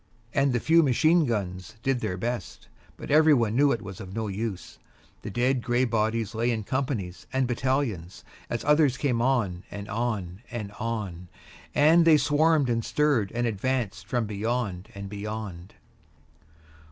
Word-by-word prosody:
And 135 0 +3
the 120 - +1
few 165 +7 +5
machine 155 +3 +3
guns 95 -4 -3
did 135 -2 +1
their 105 -6 -3
best. 120 +4 -4 0.3
But - - -7
everybody 145 -8 +5
knew 140 +3 +4
it 115 - -2
was 95 -2 -8
of 95 +1 -8
no 110 -1 -2
use. 100 -1 -5 0.4
The - - -6
dead 125 +4 +1
gray 120 +2 +1
bodies 115 -1 0
lay 115 +2 0
in 110 -3 -1
companies 115 -8 -3
and 130 0 +1
battalions, 120 - -2 0.3
as 120 - -3
others 150 -3 +3
came 125 -4 0
on 115 -9 +1
and 100 0 -7
on 105 -5 -3
and 105 -4 -5
on, 100 -6 -4 0.5
and 160 +4 +6
they 165 -2 +6
swarmed 150 0 +3
and 115 -1 0
stirred, 140 -10 +1
and 120 0 0
advanced 110 -2 -2
from 120 0 0
beyond 105 -2 -3
and 100 0 -6
beyond. 100 -3 -6
115 Hz, 155 wpm, -26 LUFS, 100-130 Hz, 0.5 s, and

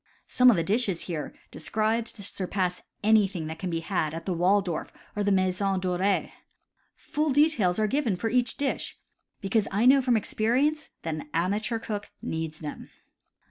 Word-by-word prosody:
Some 250 0 +5
of 240 - +6
the 165 - +1
dishes 200 -3 0
here 155 -5 -4 0.2
described 220 +6 -1
surpass 185 -3 -3 0.2
anything 205 -6 +3
that 160 +1 -6
can 185 - -3
be 165 -1 -2
had 160 -3 -1
at 165 - -6
the 190 - 0
Waldorf 180 0 +1 0.2
or 205 - 0
the 205 - +2
Maison 190 0 +1
Doree. 185 +2 0 0.6
Full 305 +1 -2
details 265 - +3
are 215 - +2
given 240 -3 +1
for 205 +6 -2
each 250 0 +1
dish, 280 -1 -2 0.4
because 200 +2 +1
I 210 +5 +1
know 270 +2 +7
from 250 -3 +3
experience 265 +9 0
that 160 - -2
an 155 -1 -6
amateur 205 +7 0
cook 210 -2 -5
needs 160 0 -4
them. 150 -2 -7
200 Hz, 165 wpm, -27 LUFS, 180-230 Hz, 0.6 s, know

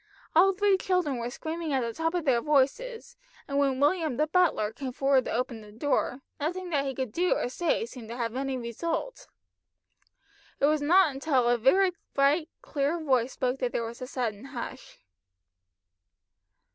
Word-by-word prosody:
All 370 +4 +7
three 400 0 +3
children 360 -9 0
were 235 0 -3
screaming 320 +3 -4
at 265 - +2
the 230 -1 -3
top 325 +4 -1
of 345 -3 -1
their 245 -4 +3
voices, 450 - 0 0.3
and 280 0 0
when 270 -2 +1
William 305 -2 +2
the 305 - +3
butler 310 - +2
came 265 0 -5
forward 270 -1 +2
to - - -3
open 235 -1 -2
the 210 -1 -13
door, 255 +2 -1 0.2
nothing 350 +4 -3
that 280 -3 +1
he 270 -1 -3
could 260 -3 -3
do 355 +9 +1
or - - -1
say 315 -3 0
seemed 235 -2 -10
to 235 - -6
have 230 -1 -2
any 270 0 -2
result. 330 - -4 1.3
It - - +4
was 305 0 +2
not 305 -3 +4
till 265 -6 +2
a 240 - +4
very 365 - +4 0.2
bright 290 +4 +3
clear 290 +3 -1
voice 260 -5 +1
spoke 255 +1 -1
that 250 -2 -1
there 230 - -1
was 235 +3 -8
a 255 - -5
sudden 240 -4 -3
hush. 260 -1 -8
275 Hz, 180 wpm, -28 LUFS, 250-330 Hz, 1.3 s, All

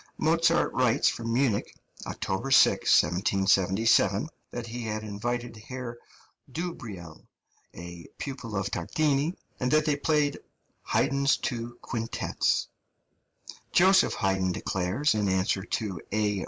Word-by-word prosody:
Mozart 165 +1 +2
writes 125 -3 +3
from 115 0 -4
Munich 120 -4 0 0.3
(October 95 +8 -3
6, 135 - +5
1777) 95 - +2 0.2
that 120 -1 -5
he 120 +1 -6
had 110 -1 -3
invited 120 +3 -4
Herr 120 +1 -7 0.5
Dubreil, 110 - -6 0.5
a 85 0 -9
pupil 130 -6 -6
of 100 0 -2
Tartini, 155 - 0 0.2
and 125 - 0
that 155 +2 +3
they 150 -2 +2
played 145 0 +1 0.5
"Haydn's 140 +1 +2
two 120 -1 -4
quintets." 115 -2 -1 1.0
Joseph 190 +2 +5
Haydn 95 -3 0
declares, 95 +12 0
in 105 -2 0
answer 95 +1 +1
to 100 -8 -3
A. 105 -1 0
115 Hz, 115 wpm, -27 LUFS, 100-140 Hz, 1.0 s, 6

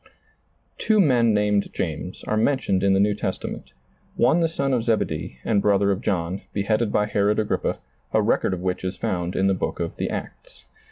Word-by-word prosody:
Two 215 -1 +2
men 125 - +4
nameti 105 -1 +1
James - - -4
are - - -1
mentioned 110 -4 +1
in 100 0 +3
the - - +3
New 105 +1 +3
Testament, 100 - -5 0.4
one 130 +8 +3
the 165 - +3
son 140 -4 -1
of 120 -3 +1
Zebedee 85 - -1
and 105 -3 +2
brother 100 -1 +3
of 95 +1 -2
John, 95 -3 -1
bt 100 - -1
headed 110 +1 +1
by 105 - +2
Herod 105 0 +1
Agrippa, 110 -1 -1 0.3
a - - +3
record 95 - +1
of 90 - -8
which 90 0 -2
is 95 0 -3
found 90 -1 -2
in 95 - +1
the 95 - +3
book 95 - -3
of - - -4
The - - -2
Acts. - - -8
105 Hz, 200 wpm, -23 LUFS, 95-115 Hz, 0.4 s, men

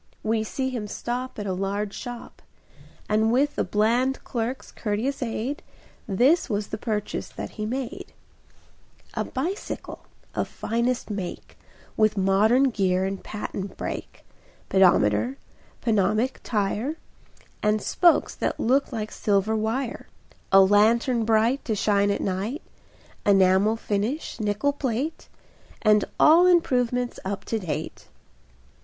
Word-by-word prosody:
We 220 0 +1
see 260 +4 -3
him 230 -5 -4
stop 245 +4 -4
At 205 - -4
a 190 - -1
large 200 +2 -2
shop, 245 -2 -8 0.7
And 220 +1 +2
with 280 +4 +2
the - - +1
bland 240 +6 +1
clerk's 240 +1 -4
courteous 230 +6 -2
aid 245 +4 -3 0.5
This 260 - +3
was 205 -2 -2
the - - -5
purchase 210 -3 -3
that - - -7
he 215 -1 -4
made: 270 - -5 1.0
A - - -1
bicycle 335 +10 -5 0.3
of - - -1
finest 235 +1 -2
make, 195 -4 -6 0.4
With 215 -1 +2
modern 215 +8 +4
gear 190 -3 +1
and 195 0 -4
patent 200 -2 -6
brake, - - -6 0.4
Pedometer, 130 - +3 0.5
pneumatic 215 +3 +1
tire, 220 +6 -1 0.7
And 210 0 +2
spokes 345 - +3
that - - -2
looked 270 +5 +2
like 215 -3 -4
silver 205 +1 +1
wire, 225 +4 -2 0.4
A 195 0 +8
lantern 225 +4 +4
bright 225 +4 +2
To 220 - 0
shine 200 0 +2
at 200 - 0
night, 200 - -2 0.6
Enamel 195 +2 +4
finish, 225 +8 -2
nickel 215 +6 0
plate, 275 +3 -3 0.5
And 210 -1 +4
all 335 +4 +7
improvements 250 -8 +2
up 195 +1 -4
to 225 - -1
date. 175 - -5
220 Hz, 125 wpm, -25 LUFS, 205-255 Hz, 1.0 s, A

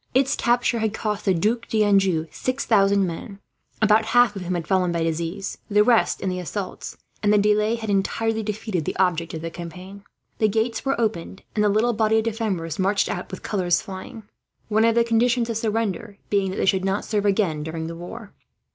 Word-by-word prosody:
Its 270 +1 +3
capture 240 0 +1
had 220 -1 -1
cost 210 -2 -3
the 195 - +4
Duc 220 +7 0
d'Anjou 195 -6 +2
6000 200 -7 +2
men, 185 +4 -6 0.5
about 215 +1 +4
half 235 -1 +4
of 195 - -5
whom 180 0 -2
had 165 -3 -4
fallen 185 -2 +2
by 170 -1 -1
disease, 165 +4 -3
the 210 0 +5
rest 235 0 +3
in - - -2
the 180 0 -3
assaults; 185 +2 -5 0.2
and 210 - +3
the 210 - +5
delay 210 +2 +2
had 225 -1 -6
entirely 220 +3 0
defeated 210 -4 -3
the - - -3
object 170 -3 0
of 160 - -6
the 165 - -4
campaign. 180 +4 -9 0.4
The 215 - +4
gates 225 +2 -1
were 270 -2 0
opened, 210 -4 -2
and 210 - +1
the 210 - +4
little 220 +4 +2
body 220 0 +2
of 220 - +2
defenders 205 -8 -2
marched 195 +2 +1
out, 180 - -4
with 190 - -8
colours 180 -4 +1
flying. 195 +3 -8 0.5
One 220 +1 +3
of 230 0 +3
the 235 - +5
conditions 235 +1 +2
of 225 - -2
surrender 220 -2 -2
had - - -40
been 200 -2 +2
that 190 - -5
they - - +1
should 190 -1 +2
not 195 +2 -1
serve 210 -2 0
again 190 -7 +1
during 160 +1 -4
the 165 +1 -6
war. 200 +6 -9
205 Hz, 210 wpm, -23 LUFS, 185-225 Hz, 0.5 s, the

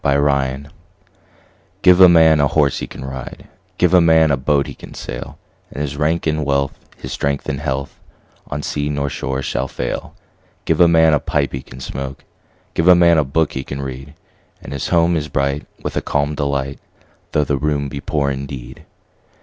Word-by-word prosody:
Gifts 70 0 +1 1.1
GIVE 90 0 +6
a 90 - +10
man 80 -2 +6
a 70 - +4
horse 70 -1 +1
he - - -5
can 65 - -9
ride, 65 -1 -8 0.3
Give 90 0 +3
a 90 - +7
man 80 -2 +5
a - - +4
boat 70 +1 +1
he - - -7
can - - -12
sail; - - -7 0.3
And - - -8
his 70 -2 -3
rank 75 +3 0
and 80 -1 0
wealth, 70 -1 0 0.2
his - - -8
strength 70 0 -2
and 70 - -2
health, 70 -1 -4 0.5
On 75 0 -4
sea 75 0 -2
nor 70 -1 -2
shore 65 +1 -3
shall 65 0 -2
fail. - - -5 0.5
Give 80 +1 +2
a 85 - +8
man 80 -1 +5
a 75 - +3
pipe 70 0 -1
he 65 - -3
can 65 -1 -13
smoke, 65 0 -6 0.5
5 - - -40
Give 85 - +1
a 90 - +9
man 85 -2 +5
a - - +3
book 75 +4 0
he 65 - -3
can 70 - -6
read: 70 +2 -7 0.4
And - - -9
his 70 - -3
home 85 0 +3
is 75 -2 -2
bright 70 0 -1 0.2
with - - -4
a - - 0
calm 70 +1 -1
delight, 70 -2 -2 0.5
Though 75 - +3
the 70 -1 0
room 75 -1 0
be 70 0 -6
poor 70 -2 0
indeed. 65 -2 -7
70 Hz, 200 wpm, -19 LUFS, 70-80 Hz, 1.1 s, a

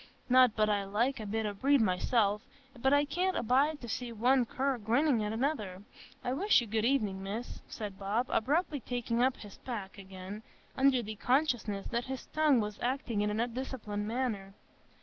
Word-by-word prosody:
Not 255 -2 +6
but 215 -1 +3
I 205 -1 +1
like 230 +7 0
a 215 - -5
bit 220 +2 -1
o' 205 - -2
breed 275 +7 +3
myself, 210 +1 +2 0.3
but 265 +2 +1
I 285 +1 +4
can't 360 +6 0
abide 275 +6 +2
to 240 - -7
see 235 +2 -4
one 245 +2 +3
cur 265 0 -1
grinnin' 235 +3 +2
at 210 0 -1
another. 220 -6 -2 0.4
I 250 - -1
wish 390 +10 +4
you 240 - -3
good 220 0 0
evenin', 215 -7 +1
Miss," 210 +5 -5
said 205 -4 -6
Bob, 205 +5 0
abruptly 290 +5 +1
taking 240 -1 -2
up 255 +1 +2
his 205 -2 -12
pack 210 -5 -6
again, 190 +2 -8 0.3
under 265 -2 +3
the 215 0 -6
consciousness 245 -6 +1
that 240 0 -1
his 265 0 -5
tongue 305 -5 +4
was 210 -1 -3
acting 245 -4 -1
in 210 - +1
an 210 +1 -2
undisciplined 235 -4 -3
manner. 215 -5 -2
235 Hz, 185 wpm, -31 LUFS, 210-265 Hz, 0.4 s, Not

